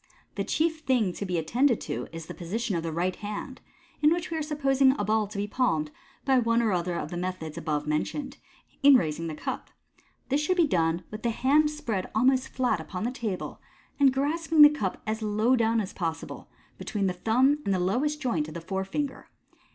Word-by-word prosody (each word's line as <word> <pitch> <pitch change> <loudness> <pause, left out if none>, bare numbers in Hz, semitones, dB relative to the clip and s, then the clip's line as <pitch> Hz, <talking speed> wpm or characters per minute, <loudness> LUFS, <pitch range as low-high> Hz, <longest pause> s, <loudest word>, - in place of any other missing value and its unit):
The - - -2
chief 320 0 0
thing 245 - +1
to 200 - -5
be 180 -1 -1
attend, 230 - +2
J 240 - +3
to - - -5
is 165 -1 -7
the - - -8
position 205 +4 -3
of 165 - 0
the 165 0 -3
right 175 +3 -1
hand 210 +5 -6 0.4
(in 300 +1 +5
which 340 0 -1
we 325 - -1
are - - -1
supposing 275 -3 +2
a 205 - -1
ball 215 0 +1
to 200 - -8
b. 200 - 0
palmed 165 - 0 0.3
by 265 -2 +4
one 230 -1 +2
or 220 - +2
other 175 -1 -1
of 155 - -4
the 175 - -4
methods 180 -3 -4
above 150 -2 -2
mentioned) 155 - -2 0.4
in 280 -1 +8
raising 165 -6 0
the 155 - -5
cup. - - -5 0.6
This 280 +2 +2
should 365 +5 0
be 340 - +5
done 170 - +1
with 215 0 -7
the 235 - 0
hand 285 +6 +3
spread 240 -11 -3
almost 255 +3 +3
flat 255 -8 0
upoi 180 +4 -5
the 240 - -1
table, 220 -8 -5 0.4
and 275 -2 +6
grasping 305 +3 +3
the 295 - +11
cup 210 -11 -3
as 220 +1 -2
low 215 +4 +2
down 230 -1 +2
as 205 -3 -4
possible, 165 -3 -5 0.3
between 205 -4 -2
th 180 -1 -3
thumb 260 +6 +3
.nd 200 - -1
the 190 - +2
lowest 250 +12 0
joint 185 - -1
of 155 - -9
the - - -3
forefinger. 195 - -3
220 Hz, 215 wpm, -27 LUFS, 180-270 Hz, 0.6 s, the